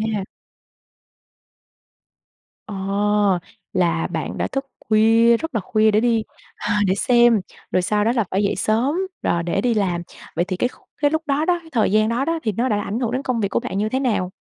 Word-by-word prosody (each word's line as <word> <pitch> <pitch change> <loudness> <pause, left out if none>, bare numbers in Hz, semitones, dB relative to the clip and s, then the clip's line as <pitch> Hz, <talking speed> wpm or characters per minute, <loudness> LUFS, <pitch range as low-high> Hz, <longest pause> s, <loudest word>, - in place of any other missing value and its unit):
ha. 195 - -2 2.4
Ồ! 205 - -7 1.0
Là 170 -2 +1
bạn - - -4
đã - - -1
thức 270 0 -3 0.2
khuya, 225 +2 +5
rất 325 -3 -6
là 220 - +1
khuya 215 +3 +2
để 210 - +3
đi 230 -2 +2 0.3
à, 210 - -1
để 190 - +2
xem, 240 0 +4 0.3
rồi 185 - +2
sau 210 +3 +1
đó 230 - +3
là 230 - +2
phải 195 +2 +1
dậy 200 - +1
sớm, 240 +8 +1 0.3
rồi 170 0 +1
để 175 - -1
đi 245 -2 +2
làm. 180 -5 0 0.3
Vậy 175 - +1
thì 185 -2 -3
cái 245 - +1
khúc - - -22
cái 290 - +3
lúc 315 0 0
đó 290 +3 +1
đó, 355 -1 +2
cái 325 - -16
thời 225 -6 +2
gian 215 +1 +3
đó 245 +4 0
đó, 330 0 -1
thì 215 - 0
nó 240 +6 -1
đã 205 -2 +1
ảnh 215 +4 -3
hưởng 235 -3 -1
đến 260 +3 -2
công 255 -3 -1
việc 200 - 0
của - - 0
bạn 235 -6 -5
như 215 +1 0
thế 260 +3 -1
nào? 200 -8 0
220 Hz, 215 wpm, -21 LUFS, 200-250 Hz, 2.4 s, khuya